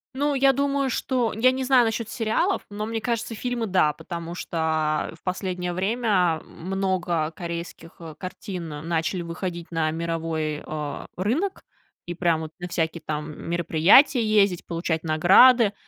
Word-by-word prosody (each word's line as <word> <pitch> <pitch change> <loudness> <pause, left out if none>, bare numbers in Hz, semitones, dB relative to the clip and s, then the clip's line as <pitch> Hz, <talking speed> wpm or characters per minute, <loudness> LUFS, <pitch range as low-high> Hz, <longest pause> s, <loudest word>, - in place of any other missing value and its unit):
Ну, 290 +2 +1
я 270 0 +4
думаю, 280 0 0
что, 245 -2 0
я 245 +4 +4
не 260 0 -2
знаю 255 -2 +5
насчет 225 0 -2
сериалов, 225 -3 0
но, 210 +1 -4
мне 225 0 -3
кажется, 230 -1 -2
фильмы- 245 0 -2
да, 180 -6 +3
потому 170 +2 -7
что 160 -3 -1
в - - -43
последнее 180 -1 -3
время 190 -4 +1
много 180 -3 -2
корейских, 170 -1 -6
э, 160 -2 -9
картин 185 -1 -6 0.2
начали 170 +2 -1
выходить 170 0 -5
на 160 -1 0
мировой, 165 -2 -3
э, 150 -2 -5
рынок, 275 - -1 0.4
и 175 - -4
прям 170 -2 +1
вот 160 -1 -6
на 180 - -5
всякие 165 -1 -2
там 150 +1 -5
мероприятия 170 - +5
ездить, 205 -4 +2
получать 165 -1 -2
награды, 200 +8 +6
180 Hz, 145 wpm, -24 LUFS, 165-225 Hz, 0.4 s, награды